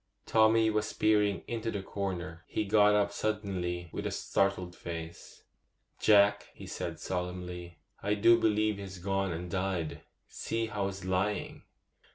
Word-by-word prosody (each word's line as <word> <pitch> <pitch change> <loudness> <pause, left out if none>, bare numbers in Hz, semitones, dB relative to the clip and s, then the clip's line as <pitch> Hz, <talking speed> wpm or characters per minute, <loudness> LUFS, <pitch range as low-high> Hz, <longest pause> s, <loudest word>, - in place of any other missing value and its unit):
Tommy 110 0 +4
was 105 0 0
peering 105 -4 +2
into 115 -1 -2
the 100 -3 -3
corner. 90 -4 -4
He 105 - -1
got 105 0 +5
up 100 -1 +2
suddenly 95 -5 -2
with - - -3
a - - -1
startled 95 -2 0
face. 85 -1 -8 0.6
'Jack,' 100 -1 +5
he - - -10
said - - -5
solemnly, 90 -1 -5 0.2
'I 105 +1 +1
do 115 +3 +6
believe 110 -2 +2
he's 95 -1 -7
gone 95 +1 -1
and 85 +1 -5
died! 95 -4 -2 0.3
See 115 0 -2
how 105 -3 -2
he's 95 -1 -6
lying. 95 +3 -1
100 Hz, 145 wpm, -31 LUFS, 90-105 Hz, 0.6 s, do